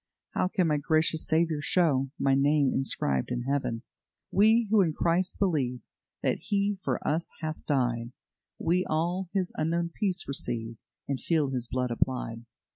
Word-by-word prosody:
How - - +1
can 185 -1 +1
my 150 -2 +2
gracious 155 +2 +1
Saviour 160 -1 +1
show 145 -6 +2
My 135 -1 +2
name 140 0 +3
inscribed 70 - 0
in 125 -1 -2
Heaven? 130 -4 -1 0.5
"We 220 +3 +4
who 215 -2 +6
in 165 -4 +1
Christ 175 +4 0
believe 140 -10 0 0.4
That - - +1
He 200 -1 0
for - - -2
us 160 +3 0
hath 155 0 -4
died, 120 -4 0 0.5
We 180 +2 +1
all 175 +4 0
His 190 -3 -1
unknown 170 +2 0
peace 190 -4 -1
receive, 115 -4 -3 0.3
And 140 -2 -2
feel 155 -5 +1
His 125 -2 -2
blood 125 0 -1
applied. 120 -1 -2
155 Hz, 155 wpm, -28 LUFS, 130-175 Hz, 0.5 s, who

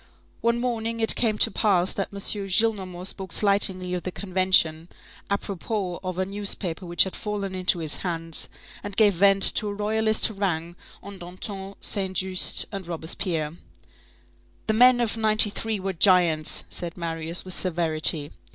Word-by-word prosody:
One 235 0 +1
morning 230 -2 -3
it 225 - +6
came 220 -3 0
to - - +5
pass 190 -4 +1
that 195 - -3
M. 200 - -9
Gillenormand 195 -2 0
spoke 190 -1 -4
slightingly 190 -3 +2
of 180 - -2
the 185 - -5
Convention, 185 -4 +1 0.4
apropos 200 -1 -3
of 185 -1 -5
a 185 - 0
newspaper 195 -3 -2
which 175 0 +4
had 190 - -6
fallen 205 -2 -4
into 185 -1 +1
his 155 -4 -4
hands, 165 -6 -3 0.3
and 205 -1 -8
gave 210 -3 +5
vent 195 +2 +3
to 215 - 0
a 205 - -3
Royalist 220 +1 +1
harangue 175 -5 -2 0.3
on 200 -1 -10
Danton, 190 +2 -7
Saint 190 -2 0
Juste 185 -1 +3
and 195 -4 -7
Robespierre.—"The 165 +4 -7
men 245 +2 +5
of 230 -1 -1
'93 215 0 0
were 190 0 -3
giants," 170 -4 +3
said 175 -1 -7
Marius 165 0 -2
with 185 - -2
severity. 160 -4 +1
190 Hz, 150 wpm, -24 LUFS, 175-205 Hz, 0.4 s, it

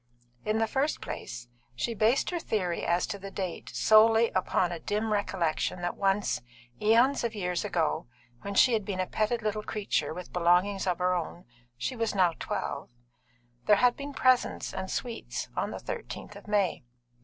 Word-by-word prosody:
In 215 +1 0
the 225 - +2
first 270 +6 0
place, 120 0 -6 0.3
she 230 - -1
based 225 - +2
her 350 - -1
theory 185 - -1
as 175 +1 +2
to 200 -2 -5
the 195 +1 -7
date 190 -3 -5
solely 225 +1 +5
upon 185 -1 +1
a 170 - -4
dim 210 +5 -1
recollection 180 -3 -1
that 175 - -1
once, 195 -9 +1 0.4
eons 235 +6 +4
of 230 -1 -2
years 180 -3 -1
ago, 170 - 0 0.3
when 200 0 -5
she 250 +4 +6
had 220 -2 +1
been 195 -2 -4
a 185 - +1
petted 220 +4 -1
little 215 0 -1
creature 205 -9 -1
with 180 +2 -8
belongings 180 +3 +2
of 180 -2 +1
her 180 0 +2
own 175 0 -4 0.3
(she 125 - -3
was 230 -3 -1
now 180 -3 +4
twelve), - - -3 0.8
there 210 - +7
had 245 +3 +4
been 285 0 -6
presents 255 -1 +2
and 190 0 -4
sweets 235 -2 -4
on - - -1
the - - -5
13th - - -6
of - - -12
May. 200 -8 +1
200 Hz, 180 wpm, -29 LUFS, 180-225 Hz, 0.8 s, there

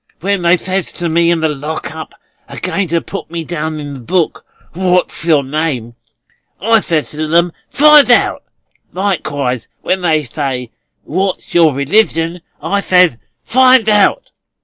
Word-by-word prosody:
When 200 +1 0
they 175 +1 +4
says 185 +1 -3
to 170 -1 -3
me 170 +1 +2
in 170 -1 +1
the 160 - +2
Lock 150 +1 -5
up, 160 - -9 0.3
a - - -9
going 195 -2 -2
to 170 +1 0
put - - -7
me 165 0 -5
down 160 -1 -4
in 145 -1 -7
the 135 - -8
book, 170 +7 -2 0.3
'What's 180 -2 0
your 155 -4 +3
name?' 135 -5 -3 0.7
I 225 +3 +3
says 165 -6 -2
to 155 +1 -4
them, 170 +2 +2 0.2
'Find 300 -1 +6
out.' 245 - +3 0.5
Likewise 145 - -2 0.2
when 185 - -1
they 160 -3 +1
says, 130 -2 -4 0.3
'What's 190 +4 -3
your 165 -5 +4
religion?' 165 +2 +1 0.2
I 200 - 0
says, 180 - +3 0.3
'Find 255 -2 +4
out. 210 - +2
170 Hz, 155 wpm, -14 LUFS, 150-190 Hz, 0.7 s, Find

